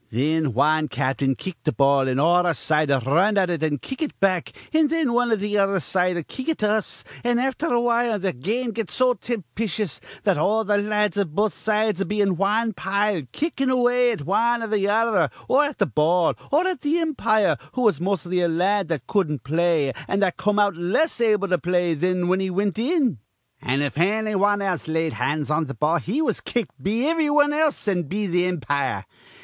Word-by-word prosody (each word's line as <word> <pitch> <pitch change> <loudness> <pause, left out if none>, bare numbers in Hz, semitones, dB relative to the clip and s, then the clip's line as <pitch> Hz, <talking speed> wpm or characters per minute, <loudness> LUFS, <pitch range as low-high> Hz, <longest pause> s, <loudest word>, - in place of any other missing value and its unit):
Thin 150 +3 0
wan 155 +3 +2
cap'n'd 135 0 -1
kick 185 -3 -6
th' 155 - -2
ball, 140 -1 +3
an' 130 - -1
all 175 +5 +3
our 170 - +1
side'd 155 -1 +1
r 135 -2 +2
run 185 +10 +2
at 185 -2 +2
it 165 -3 -2
an' 155 -2 0
kick 265 - -8
it 310 - -4
back; 185 -3 +1 0.2
an' 310 -1 +3
thin 315 -6 0
wan 245 0 +1
iv 215 -3 +1
th' 205 0 -2
other 195 -1 +2
side'd 180 -1 -1
kick 260 +4 -6
it 320 - 0
to 210 -1 +1
us, 215 -2 -1 0.2
an' 240 0 +1
afther 265 +6 -1
awhile 235 -2 +1
th' 185 -9 -3
game'd 230 - -2
get 220 -4 -4
so 255 +7 +2
timpischous 215 - -4 0.2
that - - +2
all 215 +7 +1
th' 205 0 +2
la 210 +1 -3
ads 210 -1 +1
iv 165 -6 -2
both 210 0 +1
sides'd 215 -3 0
be 210 +1 -2
in 195 -3 +2
wan 215 +5 0
pile, 200 0 -1
kickin' 275 -4 -1
away 245 -1 +3
at 185 -11 -5
wan 230 +5 +1
or 220 -1 -1
th' 200 - 0
other 210 -7 +2 0.2
or 290 +3 +4
at 285 -1 -5
th' 125 - -1
ball 165 +4 +2 0.2
or 310 +6 +3
at 370 -2 -2
th' - - -4
impire, 270 - +1 0.2
who 250 - -1
was 205 -9 +2
mos'ly 185 -1 -1
a - - +3
la 170 +2 0
ad 195 - -4
that 155 -7 -3
cudden't 155 -7 -1
play 160 -1 +1
an' 195 - -1
that 190 -3 +1
come 210 +1 0
out 205 -3 +2
less 195 - 0
able 210 -3 +2
to 180 -2 +1
play 175 +2 0
thin 180 +4 0
he 180 - -2
was 175 - 0
whin 185 +1 +2
he 190 0 -1
wint 200 +3 -1
in. 260 - +1 0.4
An', 135 +3 0
if 145 +1 -3
anny 215 +4 +1
wan 205 +1 +2 0.2
laid 160 0 -1
hands 150 0 -2
on 155 +1 0
th' 140 - -7
ball, 160 +3 +1
he 255 - -2
was - - -1
kicked 235 -6 -4
be 225 +8 0
ivry 320 -2 +1
wan 290 0 +3
else 305 -6 0
an' 185 -3 +1
be 200 +7 -3
th' 180 -1 +1
impire. 145 -5 -2
195 Hz, 220 wpm, -23 LUFS, 165-230 Hz, 0.4 s, or